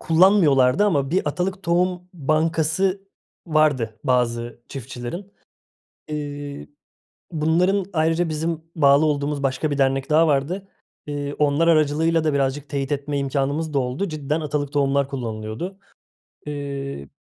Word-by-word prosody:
kullanmıyorlardı 160 Hz, -3 st, +4 dB
ama 140 Hz, -9 st, +1 dB
bir 175 Hz, -3 st, +1 dB
atalık 185 Hz, +4 st, -2 dB
tohum 180 Hz, +1 st, 0 dB
bankası 160 Hz, +5 st, +1 dB, 0.5 s
vardı 145 Hz, -9 st, +1 dB
bazı 120 Hz, -2 st, 0 dB
çiftçilerin. 135 Hz, -, -7 dB, 0.8 s
Eee, 145 Hz, -1 st, -5 dB, 0.6 s
bunların 175 Hz, +5 st, +2 dB
ayrıca 165 Hz, +1 st, +1 dB
bizim 160 Hz, +1 st, -2 dB
bağlı 145 Hz, -1 st, +5 dB
olduğumuz 145 Hz, -1 st, -1 dB
başka 135 Hz, +3 st, 0 dB
bir 145 Hz, -, -1 dB
dernek 135 Hz, 0 st, +1 dB
daha 160 Hz, +2 st, +5 dB
vardı. 160 Hz, +8 st, 0 dB, 0.4 s
Eee, 145 Hz, -1 st, -3 dB
onlar 150 Hz, +3 st, +3 dB
aracılığıyla 160 Hz, +1 st, +3 dB
da 155 Hz, -2 st, +1 dB
birazcık 140 Hz, +1 st, -1 dB
teyit 140 Hz, -1 st, -2 dB
etme 145 Hz, 0 st, -2 dB
imkânımız 140 Hz, +3 st, -1 dB
da 140 Hz, -, +2 dB
oldu. 130 Hz, +10 st, -2 dB
Cidden 155 Hz, -1 st, -2 dB
atalık 145 Hz, -2 st, -2 dB
tohumlar 140 Hz, -1 st, +2 dB
kullanılıyordu. 115 Hz, -, -5 dB, 0.7 s
Eee, 140 Hz, -, -5 dB
150 Hz, 120 wpm, -22 LUFS, 140-165 Hz, 0.8 s, bağlı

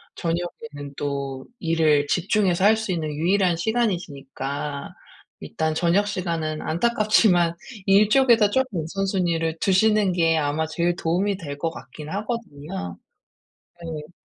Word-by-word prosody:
저녁에는 170 Hz, -3 st, -4 dB
또 140 Hz, -2 st, -3 dB
일을 160 Hz, -5 st, +2 dB
집중해서 185 Hz, +1 st, +1 dB
할 215 Hz, +2 st, +6 dB
수 220 Hz, -3 st, -3 dB
있는 165 Hz, -3 st, -1 dB
유일한 175 Hz, +4 st, +2 dB
시간이시니까 145 Hz, -, -3 dB, 0.5 s
일단 155 Hz, -, -2 dB
저녁 175 Hz, +5 st, +2 dB
시간은 165 Hz, -5 st, -2 dB
안타깝지만 205 Hz, -2 st, +3 dB, 0.3 s
일 200 Hz, +1 st, +5 dB
쪽에다 235 Hz, -3 st, +5 dB
쪼끔 255 Hz, -6 st, 0 dB
우선순위를 170 Hz, -3 st, -1 dB
두시는 205 Hz, 0 st, +3 dB
게 165 Hz, -2 st, +2 dB
아마 150 Hz, +1 st, 0 dB
제일 170 Hz, +2 st, 0 dB
도움이 185 Hz, +4 st, 0 dB
될 145 Hz, -6 st, -7 dB
것 165 Hz, +3 st, -1 dB
같긴 150 Hz, 0 st, -10 dB
하거든요. 155 Hz, -, -5 dB, 0.9 s
네. 155 Hz, 0 st, -7 dB
170 Hz, 280 characters per minute, -23 LUFS, 155-200 Hz, 0.9 s, 할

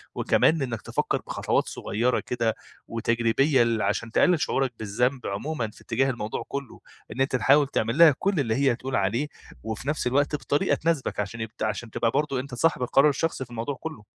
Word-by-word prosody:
وكمان 160 Hz, -1 st, +3 dB
أنكَ 120 Hz, -4 st, -3 dB
تفكّر -, -, -1 dB
بخطوات -, -, 0 dB
صغيّرة 120 Hz, +4 st, -1 dB
كده 115 Hz, -3 st, -1 dB, 0.3 s
وتجريبية 115 Hz, +4 st, +2 dB
لل 115 Hz, -2 st, 0 dB
عشان 105 Hz, +3 st, -1 dB
تقلل 175 Hz, +5 st, +3 dB
شعوركَ 135 Hz, -2 st, 0 dB
بالذنب 125 Hz, +5 st, -1 dB
عمومًا 115 Hz, +5 st, -3 dB
في -, -, -18 dB
اتجاه 130 Hz, +3 st, 0 dB
الموضوع 115 Hz, -4 st, -3 dB
كلّه. 140 Hz, -3 st, -6 dB, 0.3 s
إن 130 Hz, -, -3 dB
أنت 135 Hz, -1 st, +1 dB
تحاول 135 Hz, +5 st, +4 dB
تعملها 140 Hz, +6 st, +4 dB
كل 195 Hz, -4 st, +1 dB
اللي 115 Hz, -5 st, 0 dB
هي 135 Hz, -2 st, +2 dB
تقول 130 Hz, +2 st, -4 dB
عليه، 110 Hz, +9 st, 0 dB, 0.4 s
وفي 110 Hz, +4 st, -5 dB
نفس 150 Hz, -3 st, 0 dB
الوقت 145 Hz, +4 st, +1 dB
بطريقة 145 Hz, 0 st, +1 dB
تناسبك 165 Hz, -8 st, -1 dB
عشان 105 Hz, +3 st, -3 dB
يبق 110 Hz, -1 st, -5 dB
عشان 110 Hz, +2 st, -2 dB
تبقى 115 Hz, +1 st, 0 dB
برضو 145 Hz, -1 st, 0 dB
أنت 130 Hz, -1 st, -6 dB
صاحب 160 Hz, +2 st, +1 dB
القرار 135 Hz, +4 st, +4 dB
الشخصي 145 Hz, -1 st, -2 dB
في 120 Hz, -, -21 dB
الموضوع 120 Hz, +4 st, -3 dB
كلّه. 155 Hz, -6 st, -8 dB
125 Hz, 180 wpm, -26 LUFS, 115-140 Hz, 0.4 s, تحاول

